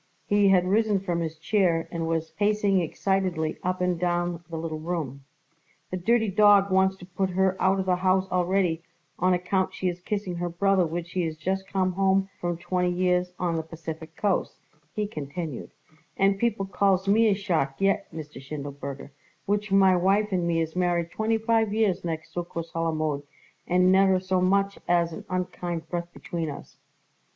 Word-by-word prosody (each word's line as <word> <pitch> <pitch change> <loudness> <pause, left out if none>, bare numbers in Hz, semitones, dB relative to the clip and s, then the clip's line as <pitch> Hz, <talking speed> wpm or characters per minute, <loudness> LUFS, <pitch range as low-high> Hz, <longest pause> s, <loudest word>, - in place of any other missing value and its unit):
He 205 -1 +3
had 185 -2 +4
risen 210 0 +2
from 175 -3 -2
his 160 -1 -3
chair 170 -1 +1
and 165 -1 -2
was 165 -1 -1
pacing 205 -2 +2
excitedly 180 -2 -1
up 185 0 -2
and 180 -2 +1
down 175 -1 -1
the 165 - -5
little 160 -1 -4
room. 155 -5 -4 0.7
"The 185 - -2
dirty 225 +5 +2
dawg 200 0 +5
wants 190 0 +3
to 180 - -12
put 185 +1 -2
her 190 +1 +1
out 190 +1 +3
of 190 - -1
the 180 -1 +2
house 185 +1 +2
already 180 -2 +1 0.4
on 185 0 +3
account 185 +1 -1
she 185 - 0
is 175 0 -6
kissing 195 -2 -3
her 175 0 -2
brother 185 +1 +2
which 170 +1 -5
he 180 - 0
is 160 -1 -3
just 190 +4 -2
come 185 -1 0
home 195 +1 +2
from 175 -1 -2
twenty 180 +1 0
years 180 0 +1
on 170 -2 -1
the - - 0
Pacific 160 0 -8
Coast," 200 -3 0 0.4
he 210 - 0
continued; 155 - -6 0.5
"and 195 0 +3
people 220 -4 0
calls 195 -1 +1
me 220 +3 +5
a 205 - +3
shark 165 -9 -1
yet, 195 0 +1
Mr. 150 -4 -8
Schindelberger, 140 0 -7 0.3
which 205 0 -1
my 190 -1 +5
wife 195 +4 +2
and 180 -2 0
me 165 -1 +1
is 160 0 -3
married 175 -2 0
twenty 220 +1 0
five 225 -1 +1
years 210 -5 +1
next 160 -1 -5
Succos 170 -1 -5
Halamode 155 -3 -1 0.5
and 180 +1 +4
never 190 0 +5
so 185 0 0
much 195 +2 +2
as 170 -1 +2
an - - -8
unkind 175 -2 -3
breath 175 -1 -4
between 165 -2 -4
us." 140 - -9
180 Hz, 180 wpm, -26 LUFS, 165-195 Hz, 0.7 s, dawg